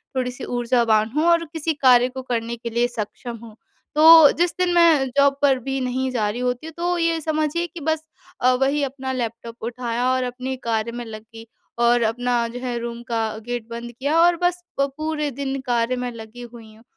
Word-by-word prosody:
थोड़ी-सी 250 -1 -3
ऊर्जावान 235 -3 +1
हूँ 305 - +2
और 335 0 +4
किसी 320 0 -1
कार्य 250 -3 +5
को 260 +1 -7
करने 235 -2 -3
के 235 0 -6
लिए 235 +1 +1
सक्षम 235 +1 -6
हूँ। 220 -2 -12 0.4
तो 320 -1 +9
जिस 350 0 +2
दिन 360 -1 +2
मैं 330 -5 +5
जॉब 280 0 +4
पर 270 -2 +3
भी 270 0 -2
नहीं 255 +1 -1
जा 215 -4 0
रही 230 - -4
होती 250 +5 -2
हूँ 320 - -9
तो 350 +1 0
ये 335 -1 +1
समझिए 310 +2 -1
कि 340 - -10
बस 315 +1 -1 0.4
अ, 255 - +5
वही 280 +2 +2
अपना 265 -1 -4
लैपटॉप 230 -2 -5
उठाया 240 0 -2
और 255 0 +1
अपने 255 +1 -4
कार्य 230 0 -1
में 240 0 -6
लग 215 -1 -8
गई 225 0 -13 0.4
और 240 0 +4
अपना 240 +1 0
जो 240 +2 -7
है 250 -1 -3
रूम 235 0 -6
का 230 -1 -1 0.2
गेट 240 -2 -4
बंद 235 +1 -7
किया 285 +7 -1
और 345 0 +5
बस 355 0 +1 0.2
पूरे 300 +2 -2
दिन 275 +1 -4
कार्य 240 +1 +1
में 250 -1 -3
लगी 225 +1 -10
हुई 230 -2 -12
हूँ। 225 - -20
250 Hz, 205 wpm, -22 LUFS, 235-290 Hz, 0.4 s, तो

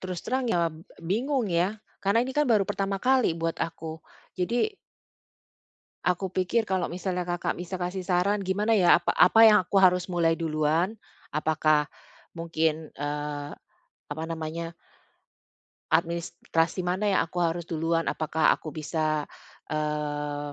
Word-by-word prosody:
Terus 185 -2 -5
terang 260 0 -1
ya, 170 -6 +1
b - - -13 0.3
bingung 240 - 0
ya, 175 +5 +1 0.3
karena 205 +4 +3
ini 260 - -4
kan 295 -1 +3
baru 215 -4 +4
pertama 195 -1 -1
kali 255 -9 +3
buat 165 0 -2
aku, 160 -1 -4 0.4
jadi 240 - +1 1.4
aku 180 +1 0
pikir 185 +5 +1
kalau 190 -4 -1
misalnya 180 0 -3
Kakak 175 0 -2
bisa 180 +1 -6
kasih 180 0 -3
saran 190 +3 +2
gimana 210 +4 +1
ya, 175 - +6
apa - - +1
apa 205 +5 +6
yang 215 -2 +8
aku 200 - -2
harus 180 -1 +4
mulai 170 -2 +1
duluan? 160 +5 0 0.4
Apakah 155 -1 +2 0.5
mungkin, 160 -1 -1
eee, 145 0 -4 0.6
apa 160 +2 -4
namanya 165 +1 -5 1.2
administrasi 170 +1 0
mana 185 +4 -1
yang - - +4
aku 175 +2 -5
harus 170 0 0
duluan? 165 0 0
Apakah 155 0 +2
aku 155 - -5
bisa, 155 -1 -1 0.5
eee, 145 -1 -2
170 Hz, 135 wpm, -27 LUFS, 160-190 Hz, 1.4 s, yang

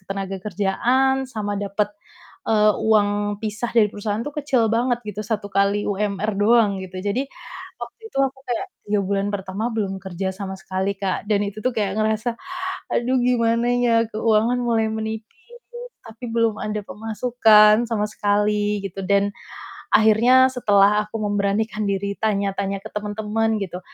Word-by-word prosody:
ketenagakerjaan, 195 +7 0 0.2
sama 205 -3 -3
dapet, 205 +1 -2 0.6
eee, 215 -1 +5
uang 205 -1 +2
pisah 220 +2 -3
dari 230 -3 +4
perusahaan 210 +1 -3
tuh 295 - -5
kecil 270 -6 +1
banget, 235 +2 +1
gitu, 210 0 -4
1 215 -1 -3
kali 200 +1 +1
UMR 205 +1 -1
doang 215 +2 +4
gitu. 185 0 -8
Jadi 205 +8 -1 0.5
waktu - - -9
itu 275 - -5
aku 270 0 -1
kayak 245 +10 -2 0.2
3 205 0 +1
bulan 200 +1 0
pertama 200 +3 -3
belum 200 -4 -2
kerja 190 0 -3
sama 190 0 -5
sekali, 195 0 -3
Kak, 195 +2 -3
dan 205 -1 +2
itu 210 +2 -7
tuh 255 - +1
kayak 205 -3 -1
ngerasa, 220 +2 0 0.6
"Aduh, 250 +2 +1
gimana 235 -1 +2
ya? 240 -1 +3 0.2
Keuangan 220 +2 +2
mulai 225 -2 +1
menipis, 220 0 -4 0.8
tapi 225 +2 -9
belum 230 -2 +1
ada 210 0 -3
pemasukan 220 0 +4
sama 215 -3 0
sekali," 210 0 0
gitu. 195 0 -6
Dan 200 +1 +2 0.7
akhirnya 240 +4 +5
setelah 210 -3 +4
aku 225 - -5
memberanikan 205 +1 0
diri 200 0 -1
tanya-tanya 200 -2 -1
ke 220 - -8
temen-temen, 215 +1 -1
gitu, 180 -1 -6
210 Hz, 145 wpm, -22 LUFS, 200-225 Hz, 0.8 s, eee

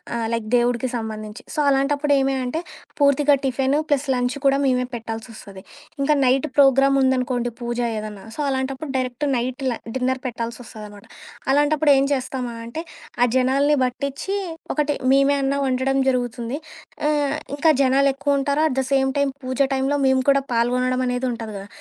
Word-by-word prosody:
ఆహ్, 230 -1 -1
లైక్ 225 -2 -2
దేవుడికి 240 +1 +1
సంబంధించి. 215 0 -6
సో, - - -3
అలాంటప్పుడు 285 +2 +2
ఏమి 270 0 +1
అంటే, 310 +6 -2 0.4
పూర్తిగా 285 +1 +4
టిఫెను 270 +2 +1
ప్లస్ 285 -1 +1
లంచ్ 245 +1 -1
కూడా 275 0 +4
మేమే 250 -1 +2
పెట్టాల్సొస్తది. 225 -4 -8 0.4
ఇంకా 290 +2 +3
నైట్ 260 +4 +2
ప్రోగ్రామ్ 275 0 +5
ఉందనుకోండి 250 -2 0
పూజ 240 0 -3 0.2
ఏదన్నా 210 -2 -8
సో, - - -12
అలాంటప్పుడు 265 +2 -3
డైరెక్ట్ 255 +2 -2
నైట్ 255 +2 -3
ల - - 0 0.3
డిన్నర్ 260 0 -1
పెట్టాల్సొస్తదనమాట. 225 -3 -7 0.5
అలాంటప్పుడు 290 +1 +3
ఏం 270 - +3
చేస్తామా 255 -2 -3
అంటే 235 +8 -5 0.4
ఆ - - +7
జనాల్ని 275 +3 +3
బట్టిచ్చి 280 +9 -3 0.4
ఒకటి 295 -1 0 0.2
మేమే 275 +1 +4
అన్నా 275 +1 0
వండడం 260 +1 0
జరుగుతుంది. 245 +1 -2 0.5
ఆహ్, 295 -1 +1 0.2
ఇంకా 320 +2 +3
జనాలెక్కువుంటారు, 275 +2 +2
అట్ 265 - -3
ద - - -2
సేమ్ 265 -1 +3
టైమ్ 280 -1 +1
పూజ 255 +1 -4 0.2
టైంలో 270 +2 0
మేము 265 0 +3
కూడా 275 0 +4
పాల్గొనడం 250 +2 +1
అనేది 250 +1 -1
ఉంటాది 225 -2 -6
గదా! 195 +1 -7
260 Hz, 150 wpm, -22 LUFS, 245-280 Hz, 0.5 s, ఆ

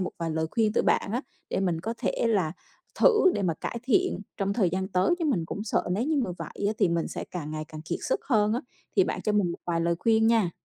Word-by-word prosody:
một 185 - -1
vài 165 -1 -2
lời 160 0 0
khuyên 220 -2 +2
từ - - +2
bạn - - +2
á, 245 - -1 0.3
để - - 0
mình 175 -4 0
có 225 +6 -3
thể - - 0
là 185 -8 +1 0.5
thử 430 -6 +6
để 200 - -1
mà 170 -3 +1
cải 235 - -5
thiện 365 - +2 0.2
trong 195 0 0
thời 200 -5 +2
gian 190 +1 -2
tới, 190 - +2
chứ 335 - -1
mình 245 - +1
cũng 205 +4 -5
sợ 200 - 0
nếu 220 +7 0
như 310 +1 +1
mà 185 - -4
vậy 200 - -4
á 210 - +2
thì - - +4
mình 170 -1 0
sẽ - - -5
càng 155 -4 -5
ngày 155 0 -4
càng 155 - -8
kiệt 170 +1 -3
sức - - 0
hơn 215 -5 +3
á. 240 - 0 0.4
Thì - - +6
bạn - - -3
cho 210 - +1
mình 195 -5 +2
một - - -8
vài 170 -1 0
lời 170 0 +2
khuyên 225 -1 +3
nha. 225 -6 +3
200 Hz, 275 wpm, -27 LUFS, 170-230 Hz, 0.5 s, thử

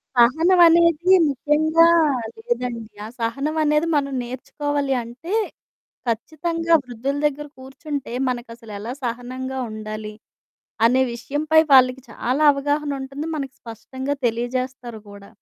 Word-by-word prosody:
సహనవనేది 335 +6 +5 0.2
ముఖ్యంగా 315 +4 +3 0.6
లేదండి. 250 - -3 0.2
ఆ - - -6
సహనవనేది 300 +6 0
మనం 275 -1 -1
నేర్చుకోవాలి 280 +3 -3
అంటే, 250 - -8 0.8
ఖచ్చితంగా 330 +8 -1
వృద్ధుల 250 +3 -3
దగ్గర 295 +1 -3
కూర్చుంటే 270 0 -6 0.2
మనకసలెలా 230 -2 -6
సహనంగా 255 +2 -4
ఉండాలి 215 0 -6 0.7
అనే 255 +3 +4
విషయంపై 300 +6 +2
వాళ్ళకి 255 0 +5
చాలా 255 +7 -1
అవగాహనుంటంది. 280 0 -3
మనకి 270 -2 -5
స్పష్టంగా 260 +5 -5
తెలియజేస్తారు 245 -1 -4
గూడా. 200 0 -13
265 Hz, 95 wpm, -22 LUFS, 240-300 Hz, 0.8 s, సహనవనేది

